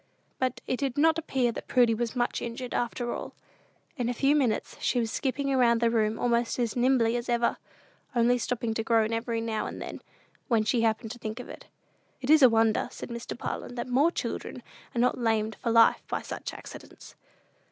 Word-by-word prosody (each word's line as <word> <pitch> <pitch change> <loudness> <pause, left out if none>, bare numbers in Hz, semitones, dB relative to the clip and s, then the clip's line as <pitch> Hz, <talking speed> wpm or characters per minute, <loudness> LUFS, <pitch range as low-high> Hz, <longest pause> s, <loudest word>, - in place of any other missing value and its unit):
But 255 -1 -1
it 255 - -1
did 275 0 -2
not 320 +2 +4
appear 265 -6 0
that - - -8
Prudy 245 -3 +4
was 235 +2 -2
much 240 -1 0
injured, 240 +1 -5
after 240 0 -2
all. - - -7 0.6
In 245 -2 -1
a 245 - -2
few 275 +4 +3
minutes 250 -7 0
she 250 - +1
was 225 -2 -1
skipping 275 +1 -1
about 240 -3 +4
the 230 0 +2
room 220 -1 +1
almost 235 -1 +1
as 235 -3 -1
nimbly 245 -2 +3
as 240 0 -3
ever, 235 0 +1 0.6
only 240 +1 +3
stopping 230 0 -2
to 225 - -2
groan 225 -1 +2
every 230 0 -1
now 225 -1 -2
and - - -7
then, - - -7 0.5
when 225 -3 +3
she 220 +2 +1
happened 225 0 0
to 240 - -9
think 220 +1 -5
of 250 - -8
it. - - -11 0.5
"It 265 +2 0
is 310 -1 +7
a 260 - +9
wonder," 225 -1 +2
said - - -8
Mr. 235 0 -6
Parlin, 245 - -5
"that 240 - -4
more 270 +6 +3
children - - -5 0.3
are - - 0
not 250 +1 +2
lamed 220 -2 0
for 235 - -1
life 230 0 +5
by - - -3
such - - -6
accidents." - - -11
240 Hz, 205 wpm, -28 LUFS, 225-250 Hz, 0.6 s, a